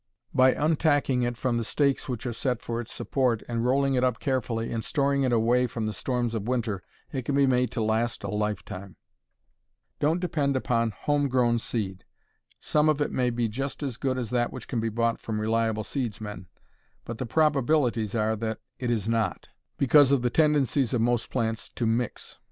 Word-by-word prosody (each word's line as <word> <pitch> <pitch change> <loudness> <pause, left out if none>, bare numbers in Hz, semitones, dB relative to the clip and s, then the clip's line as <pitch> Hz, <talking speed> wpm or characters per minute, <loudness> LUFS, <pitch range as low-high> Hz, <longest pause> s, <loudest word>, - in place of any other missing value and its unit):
By 130 0 +5
untacking 145 -4 +2
it 120 -1 -4
from 120 -1 0
the 115 - -1
stakes 140 +4 0
which 125 -1 -4
are 120 - -2
set 125 0 -1
for 120 0 -3
its 115 - -9
support, 125 -5 0
and 115 -1 -1
rolling 135 +2 +2
it 125 -1 +2
up 125 -2 +1
carefully, 120 -4 -1
and 115 -1 -2
storing 140 +1 +1
it 130 -2 +2
away 120 +2 +3
from 115 -1 -4
the 110 - -2
storms 120 +2 -1
of 110 -1 -3
winter, 115 -6 -1 0.3
it 130 -3 -3
can 140 +3 -1
be 140 0 +5
made 125 -1 +2
to 115 - -1
last 110 +2 0
a - - -3
lifetime. 105 -3 -4 1.0
Don't 155 +4 +2
depend 150 -6 0
upon 115 -3 +1
home 145 +7 0
grown 120 -2 +2
seed. 100 -5 -4 0.6
Some 150 0 +2
of 150 -1 +2
it 145 - 0
may 125 -1 +1
be 120 -1 0
just 135 +7 -4
as 130 -5 -3
good 130 -1 -1
as 120 -4 -3
that 120 -1 +1
which 130 -4 -8
can 120 - -2
be 115 0 0
bought 115 +1 0
from 110 -2 -3
reliable 110 0 0
seedsmen, 105 -7 -4 0.6
but 115 -1 -6
the 130 - -3
probabilities 135 -6 +2
are 110 0 +1
that 110 0 -3 0.2
it 125 - -2
is 110 -3 0
not, 115 -1 -1 0.3
because 140 0 +5
of 135 -3 +3
the 120 - +1
tendencies 140 -4 +2
of 115 - +1
most 120 0 +1
plants 115 -3 -2
to 120 - -3
"mix." 115 +1 -2
120 Hz, 195 wpm, -27 LUFS, 115-135 Hz, 1.0 s, By